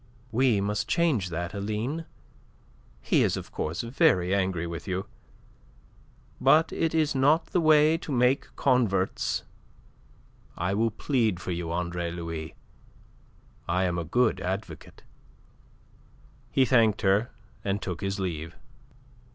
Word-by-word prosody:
"We 120 -2 +3
must 105 +1 -1
change 150 - +1
that, 85 +2 -4
Aline. 110 +10 -3 1.0
He - - +3
is - - +1
of - - -8
course 80 +2 -3
very 95 -7 +2
angry 95 -3 0
with 85 0 -6
you. 95 0 -2 1.3
But 160 +1 +4
it 165 -1 0
is 155 -2 +2
not 145 +5 +3
the 180 - 0
way 155 0 +5
to 155 - -7
make 125 +1 +2
converts. 115 -8 +1 1.1
I 90 +2 -1
will 115 +3 +2
plead 110 - 0
for 90 - -5
you, 85 -1 -3
Andre 85 0 -2
Louis. 85 -2 -6 1.1
I 90 +2 +1
am 90 -1 0
a - - -2
good 110 +4 +1
advocate." 95 -3 -6 1.5
He 130 - +3
thanked 115 -5 +3
her 100 +5 +3 0.3
and 100 0 -1
took 90 -5 -5
his 100 +1 -2
leave. 85 -3 -4
100 Hz, 125 wpm, -27 LUFS, 90-130 Hz, 1.5 s, way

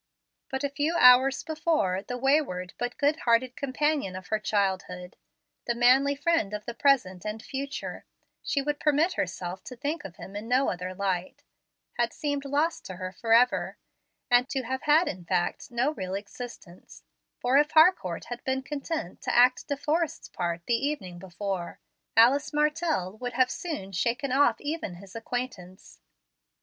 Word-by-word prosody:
But 265 0 -3
a 285 - +1
few 290 +4 -1
hours 255 0 +6
before, 310 - 0
the 245 +4 -5
wayward 250 -10 +1
but 245 0 -3
good 290 +2 +2
hearted 245 0 +2
companion 280 -6 -1
of 185 -1 -9
her 215 - +1
childhood, 190 -4 -2 0.5
the 235 - 0
manly 260 +4 +4
friend 285 -9 +1
of 210 - -7
the 235 - -5
present 235 -10 +2
and 215 +1 -4
future, 275 +4 -5 0.4
she 280 - -1
would 295 +1 -2
permit 305 +4 +2
herself 180 0 -4
to 250 - -8
think 290 +6 -3
of 185 -2 -9
him 195 - -10
in 210 +2 -5
no 255 +3 +2
other 180 +1 -5
light, 185 -2 -2 0.6
had 235 -1 +1
seemed 285 -2 -3
lost 295 +4 0
to 185 - -7
her 185 +1 -5
forever; 230 +4 +2 0.7
to 265 -2 -2
have 260 +2 -3
had 310 +3 +4
in 180 -1 -5
fact 175 +9 -1
no 245 +4 +1
real 190 -9 -4
existence; 200 -3 -9 0.4
for 250 +2 +3
if 295 +1 +3
Harcourt 315 - +4
had 240 0 -7
been 265 0 -1
content 280 - -5
to - - -1
act 250 +1 +5
De 285 - -2
Forrest's 305 +2 -1
part 170 -1 -3
the 240 - 0
evening 195 -12 -3
before, 190 0 -5 0.4
Alice 265 +6 +5
Martell 300 - 0
would 245 -1 -4
have 255 0 +3
soon 300 - -5
shaken 240 +8 -1
off 280 +3 +3
even 295 - -4
his 195 +3 -13
acquaintance. 225 - -6
245 Hz, 160 wpm, -27 LUFS, 190-285 Hz, 0.7 s, hours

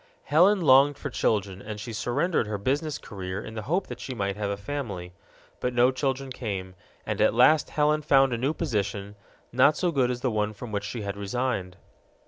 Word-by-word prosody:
Helen 185 +6 +4
longed 140 -1 +5
for 145 - -5
children, 100 -5 0
and 105 0 -7
she 115 +3 -6
surrendered 120 +5 0
her 105 -1 -2
business 145 +8 -1
career 95 -2 -6
in 110 - -8
the 110 - -4
hope 175 - -1
that - - -8
she 130 - -6
might 100 -3 -2
have 105 -1 -2
a 100 - -2
family. 100 -6 -5 0.5
But 125 0 -2
no 125 +2 +5
children 135 0 -2
came, 95 -7 -4 0.3
and - - -2
at - - +4
last 145 +6 +5
Helen 150 0 +2
found 135 -3 +4
a - - 0
new 140 +6 0
position, 105 - -2 0.4
not 130 +5 +4
so 180 -2 +1
good 130 -5 +2
as 125 -1 -3
the 130 - 0
one 105 0 -1
from 110 +2 -8
which 100 0 -2
she 115 0 -5
had 100 -1 -4
resigned. 100 -3 -2
120 Hz, 205 wpm, -26 LUFS, 100-140 Hz, 0.5 s, longed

